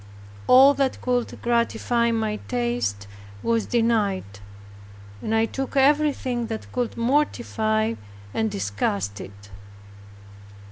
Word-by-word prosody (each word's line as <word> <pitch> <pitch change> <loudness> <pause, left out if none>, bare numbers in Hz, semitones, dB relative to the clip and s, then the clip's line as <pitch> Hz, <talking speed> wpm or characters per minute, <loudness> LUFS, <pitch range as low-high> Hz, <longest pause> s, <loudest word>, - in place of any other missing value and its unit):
All 270 +3 +8
that 275 -2 -1
could 245 -1 -1
gratify 235 0 +1
my 220 -2 -1
taste 240 - -2 0.4
was 230 -1 0
denied 225 -5 +1 1.0
and 220 - -1
I 225 0 +3
took 270 +4 -4
everything 270 -4 +2
that 220 -1 -6
could 245 -2 -2
mortify 230 -4 0 0.4
and 220 0 0
disgust 100 - -2
it. 100 +1 -12
230 Hz, 100 wpm, -24 LUFS, 215-250 Hz, 1.0 s, All